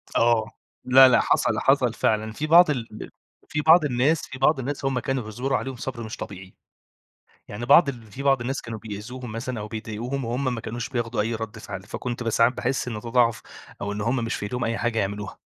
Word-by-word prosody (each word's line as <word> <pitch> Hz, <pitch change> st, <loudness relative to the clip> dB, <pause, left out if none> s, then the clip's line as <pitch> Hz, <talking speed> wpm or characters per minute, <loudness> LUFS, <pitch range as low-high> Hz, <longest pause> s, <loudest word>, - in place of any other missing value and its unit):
آه، 115 Hz, -1 st, +3 dB, 0.4 s
لأ، 130 Hz, +1 st, +8 dB
لأ، 125 Hz, -, +5 dB
حصل، -, -, +1 dB
حصل -, -, +3 dB
فعلًا. 110 Hz, 0 st, 0 dB
في 145 Hz, +8 st, -4 dB
بعض 170 Hz, +1 st, +7 dB
ال 115 Hz, -6 st, -4 dB, 0.4 s
في 150 Hz, -, -1 dB
بعض 160 Hz, +1 st, +6 dB
الناس 140 Hz, +4 st, +2 dB
في 130 Hz, -, -8 dB
بعض 140 Hz, +1 st, +3 dB
الناس 135 Hz, +2 st, -4 dB
هم 135 Hz, -2 st, 0 dB
كانوا 135 Hz, 0 st, -2 dB
بيصبروا 125 Hz, +6 st, -2 dB
عليهم 135 Hz, -1 st, -5 dB
صبر 120 Hz, -1 st, -6 dB
مش 110 Hz, -, -7 dB
طبيعي، 95 Hz, -1 st, -9 dB, 0.9 s
يعني 105 Hz, +4 st, -6 dB
بعض 140 Hz, +4 st, +6 dB
ال 125 Hz, -4 st, -6 dB
في 135 Hz, -, -7 dB
بعض 135 Hz, -3 st, +3 dB
الناس 130 Hz, +3 st, -3 dB
كانوا 115 Hz, -2 st, -7 dB
بيئذوهم 110 Hz, +4 st, -7 dB
مثلًا 115 Hz, +1 st, -4 dB
أو 105 Hz, -, -5 dB
بيضايقوهم، 115 Hz, +5 st, -4 dB
وهم 125 Hz, +2 st, -1 dB
ما 115 Hz, -, -5 dB
كانوش 120 Hz, +1 st, -5 dB
بياخدوا 120 Hz, -3 st, -1 dB
أي 115 Hz, +2 st, -1 dB
رد 110 Hz, 0 st, -6 dB
فعل، 95 Hz, -3 st, -7 dB
فكُنت 120 Hz, +4 st, -5 dB
ب 115 Hz, -, 0 dB
ساعات 115 Hz, +2 st, +3 dB
باحس 125 Hz, +1 st, -2 dB
إن 120 Hz, -, -3 dB
ده 115 Hz, -, -8 dB
ضعف، 115 Hz, -2 st, +2 dB, 0.4 s
أو 100 Hz, -, -2 dB
إن 105 Hz, +1 st, -4 dB
هم 115 Hz, +4 st, 0 dB
مش 115 Hz, -, -2 dB
في -, -, -6 dB
ايديهم 125 Hz, +4 st, -3 dB
أي 115 Hz, +1 st, -1 dB
حاجة 120 Hz, -1 st, -1 dB
يعملوها. 100 Hz, 0 st, -4 dB
120 Hz, 215 wpm, -24 LUFS, 110-130 Hz, 0.9 s, لأ